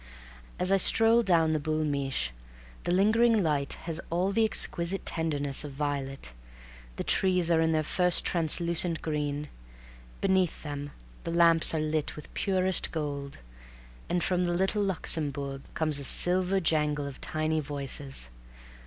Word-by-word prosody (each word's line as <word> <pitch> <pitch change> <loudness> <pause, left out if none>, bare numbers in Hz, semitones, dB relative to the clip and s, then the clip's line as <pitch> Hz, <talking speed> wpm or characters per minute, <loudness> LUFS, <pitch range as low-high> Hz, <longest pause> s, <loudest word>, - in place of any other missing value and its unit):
As 180 +1 0
I 195 - +5
stroll 225 +4 +5
down 170 -6 +2
the 155 - 0
Boul' 155 +1 -2
Mich' 135 - -1 0.5
the - - 0
lingering 215 +3 +3
light 145 -4 -1
has 165 0 -2
all 180 +4 0
the 225 +3 +2
exquisite 190 -3 0
tenderness 145 -4 -1
of 145 -2 -8
violet; 135 - -4 0.6
the - - -3
trees 180 -3 +2
are 165 -1 +3
in 160 0 +1
their 155 -1 +1
first 180 +3 +3
translucent 170 0 +1
green; 150 -1 -3 0.7
beneath 190 -3 0
them 145 -1 -6 0.3
the - - -5
lamps 165 -1 +4
are - - 0
lit 155 -1 -2
with 150 - -12
purest 190 -2 +2
gold, 140 -3 -5 0.7
and 175 0 0
from 180 -1 0
the 175 -1 0
Little 190 +3 0
Luxembourg 145 -7 -2
comes 155 -3 0
a - - -6
silver 180 +6 +3
jangle 150 -4 0
of 140 -1 -9
tiny 155 0 -1
voices. 140 - -3
160 Hz, 145 wpm, -28 LUFS, 145-180 Hz, 0.7 s, I